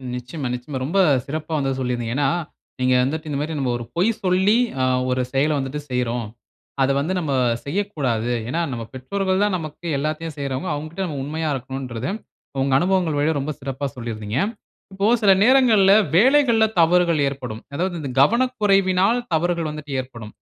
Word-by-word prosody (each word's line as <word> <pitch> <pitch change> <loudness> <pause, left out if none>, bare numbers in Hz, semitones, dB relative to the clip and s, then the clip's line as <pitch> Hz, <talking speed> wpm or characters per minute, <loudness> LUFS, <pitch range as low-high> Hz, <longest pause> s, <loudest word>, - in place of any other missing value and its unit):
நிச்சயமா, 125 +3 -5
நிச்சயமா. 130 +3 -6
ரொம்ப 190 +7 0 0.3
சிறப்பா 155 +3 -4
வந்து 135 -1 -1
சொல்லியிருந்தீங்க. 120 -2 -2
ஏன்னா, 145 - +2 0.5
நீங்க 130 0 +2
வந்துட்டு 155 +4 -3
இந்தமாரி 150 +2 -2
நம்ம 130 -3 0
ஒரு 120 - -7
பொய் 180 +6 +3
சொல்லி, 190 +4 +3 0.2
அ - - +2 0.3
ஒரு 130 0 +1
செயல 145 +3 +2
வந்துட்டு 135 +2 -3
செய்றோம். 120 -2 -1 0.5
அத 135 - +3
வந்து 160 +6 -1
நம்ம 155 -5 -2 0.3
செய்யக்கூடாது. 140 - -1 0.2
ஏன்னா, 170 +5 -1
நம்ம 120 -2 -4
பெற்றோர்கள் 190 +9 -1
தான் 205 -3 +1
நமக்கு 160 +1 -7
எல்லாத்தையும் 155 +2 -3
செய்றவங்க. 140 +5 -3
அவுங்கக்கிட்ட 155 +6 -4
நம்ம 145 -4 -4
உண்மையா 155 +2 -3
இருக்கணுன்றத, 130 -2 -5 0.6
உங்க 135 -1 0
அனுபவங்கள் 180 -4 +1
வழியா 155 +2 +2
ரொம்ப 140 +3 -3
சிறப்பா 135 +1 -4
சொல்லியிருந்தீங்க. 115 -1 -4 0.5
இப்போ 195 +1 -1 0.2
சில 200 -2 +6
நேரங்கள்ல 230 -6 +5 0.2
வேலைகள்ல 240 +1 +5 0.2
தவறுகள் 170 -1 +4
ஏற்படும். 125 -5 -5
அதாவது 180 +4 -1
இந்த 140 - -5
கவனக்குறைவினால் 205 - +3
தவறுகள் 170 0 0
வந்துட்டு 150 -1 -8
ஏற்படும். 115 -4 -8
150 Hz, 155 wpm, -22 LUFS, 130-185 Hz, 0.6 s, சில